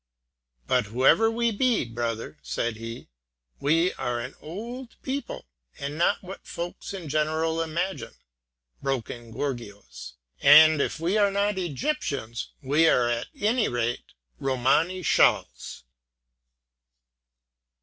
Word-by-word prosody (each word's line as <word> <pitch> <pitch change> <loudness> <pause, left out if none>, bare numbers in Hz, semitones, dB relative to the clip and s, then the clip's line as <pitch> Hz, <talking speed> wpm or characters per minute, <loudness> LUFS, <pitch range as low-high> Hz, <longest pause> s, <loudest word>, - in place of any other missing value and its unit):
"But - - +2
whoever 130 - +4
we 235 +1 +1
be, 235 - +1
brother," 115 -8 -4
said 90 - -2
he, 115 +2 -8 0.5
"we 165 +5 +2
are 120 -1 -2
an 125 +3 -6
old 235 +9 -7
people, 275 +2 -4 0.3
and 140 0 -5
not 170 +6 +1
what 190 +2 -9
folks 175 +1 -6
in 185 -5 -7
general 155 +2 0
imagine, 170 +4 -3 0.7
broken 120 -3 -4
gorgios; 115 - -6 0.3
and 155 +1 +8
if - - -2
we 180 +6 +1
are 200 -1 +4
not 200 0 0
Egyptians, 145 - -3
we 150 +5 +3
are 125 -6 +4
at 120 0 -1
any 225 +3 +2
rate 120 - -3 0.2
Romany 135 +8 +1
Chals!" - - +1
155 Hz, 115 wpm, -26 LUFS, 120-190 Hz, 0.7 s, and